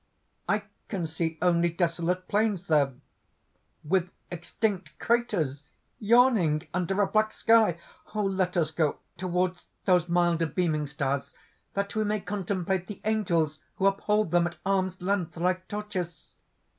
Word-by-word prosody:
"I - - +2 0.2
can 185 -5 -2
see 160 0 -2
only 175 -1 +3
desolate 175 +1 -1
plains 205 -3 +1
there, 145 -5 +3 0.9
with 180 +3 +1 0.2
extinct 175 0 -3
craters 195 - 0 0.4
yawning 215 -9 +4
under 180 +2 0
a - - +1
black 215 +1 +2
sky! 225 -8 +4 0.4
"Let 190 -3 0
us 160 -2 +1
go 155 -2 +1 0.2
towards 180 0 -1 0.2
those 180 -3 +3
milder 170 -1 +2
beaming 155 -2 0
stars, 140 -1 -2 0.4
that 200 0 -1
we 215 - +2
may 210 0 0
contemplate 190 -2 -2
the 210 - -7
angels 170 -8 +1 0.2
who 195 - -1
uphold 210 -1 +2
them 175 0 +4
at 170 - -8
arms' 185 -2 0
length, 180 -3 -1
like 185 +2 0
torches!" 195 -5 -5
180 Hz, 130 wpm, -28 LUFS, 170-200 Hz, 0.9 s, yawning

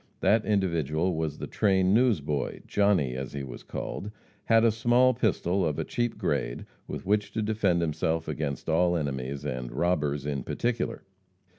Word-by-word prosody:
That 110 +1 +4
individual 85 -4 +1
was 80 -2 -2
the - - -5
train 95 -2 +2
newsboy. 85 - +1
Johnny, 100 -11 +2
as 65 0 -5
he 70 -1 -4
was 65 -3 -8
called, 105 - -5 0.4
had 115 0 +5
a 115 - +5
small 120 +3 +4
pistol, 100 -5 +1
of 80 -3 0
a - - -1
cheap 120 -1 -2
grade, - - -2 0.2
with - - -6
which 105 +2 +1
to 110 - -1
defend 105 -5 +1
himself 80 0 -1
against 70 -4 -3
all 85 +2 +3
enemies, 70 -1 -3
and 65 -3 -4
robbers 75 -1 0
in 70 -2 -2
particular. 120 - -2
85 Hz, 160 wpm, -28 LUFS, 70-105 Hz, 0.4 s, had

